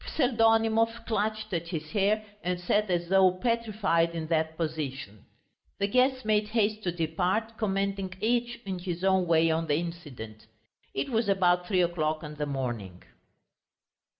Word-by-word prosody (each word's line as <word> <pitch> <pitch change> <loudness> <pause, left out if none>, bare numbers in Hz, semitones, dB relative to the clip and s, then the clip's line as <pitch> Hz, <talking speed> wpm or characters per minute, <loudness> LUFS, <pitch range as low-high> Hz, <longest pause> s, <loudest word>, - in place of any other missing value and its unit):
Pseldonimov 225 -3 +2
clutched 215 -1 -2
at 170 -1 -2
his 155 -3 -5
hair 215 +1 +1 0.2
and 180 0 -1
sat 205 +3 +1
as 175 -1 0
though 190 -1 +6
petrified 200 -6 0
in 160 -1 -3
that 160 -1 0
position. 140 - -4 0.5
The 200 - +1
guests 255 +3 +2
made 210 -1 +2
haste 215 -1 0
to 175 - +1
depart, 180 +7 -1
commenting 195 -2 -1
each 235 +2 0
in 190 -2 -3
his 175 -1 -4
own 190 -2 +3
way 165 0 +4
on 165 +1 0
the 145 - +2
incident. 145 -10 -6 0.5
It 135 - -1
was 225 -2 +1
about 180 -2 +3
three 185 -2 +3
o'clock 155 -2 -1
in 150 -1 -7
the 150 0 -3
morning. 120 -10 -4
185 Hz, 150 wpm, -28 LUFS, 160-215 Hz, 0.5 s, though